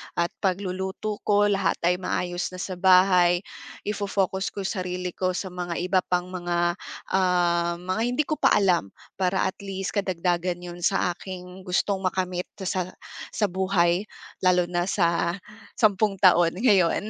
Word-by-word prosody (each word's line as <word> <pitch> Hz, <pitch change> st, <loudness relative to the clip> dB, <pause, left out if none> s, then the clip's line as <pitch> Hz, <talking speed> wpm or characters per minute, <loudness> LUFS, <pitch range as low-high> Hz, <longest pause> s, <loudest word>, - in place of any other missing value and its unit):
at 170 Hz, 0 st, 0 dB
pagluluto 190 Hz, +2 st, -2 dB
ko, 205 Hz, 0 st, +4 dB
lahat 200 Hz, 0 st, +1 dB
ay 180 Hz, +1 st, +2 dB
maayos 175 Hz, -1 st, -2 dB
na 180 Hz, -, -6 dB
sa 185 Hz, -2 st, -5 dB
bahay, 180 Hz, -1 st, +5 dB, 0.4 s
ifo-focus 200 Hz, -2 st, -1 dB
ko 200 Hz, -, -3 dB
sarili 180 Hz, -2 st, -3 dB
ko 185 Hz, 0 st, -1 dB
sa 190 Hz, 0 st, -4 dB
mga 175 Hz, -1 st, -4 dB
iba 185 Hz, +1 st, +2 dB
pang 180 Hz, 0 st, -1 dB
mga, 175 Hz, -1 st, -1 dB, 0.3 s
ah, 175 Hz, -2 st, +2 dB
mga 185 Hz, +4 st, -3 dB
hindi 250 Hz, +5 st, +1 dB
ko 305 Hz, +1 st, -3 dB
pa -, -, +4 dB
alam. 180 Hz, -, +3 dB, 0.3 s
Para 190 Hz, 0 st, +1 dB
at 190 Hz, -, -2 dB
least, 195 Hz, -1 st, -4 dB
karagdagan 180 Hz, -2 st, -1 dB
yun 175 Hz, 0 st, -8 dB
sa 180 Hz, 0 st, +1 dB
aking 185 Hz, +1 st, -9 dB
gustong 190 Hz, +2 st, +1 dB
makamit 185 Hz, -1 st, -2 dB, 0.2 s
sa 185 Hz, -1 st, -1 dB, 0.5 s
sa 215 Hz, -, +2 dB
buhay 185 Hz, 0 st, +1 dB, 0.3 s
lalo 180 Hz, -1 st, +4 dB
na 175 Hz, +1 st, -1 dB
sa 170 Hz, -2 st, +1 dB, 0.4 s
sampung 205 Hz, -2 st, +2 dB
taon 175 Hz, -3 st, +5 dB
ngayon. 205 Hz, -3 st, +3 dB
185 Hz, 145 wpm, -25 LUFS, 175-195 Hz, 0.5 s, bahay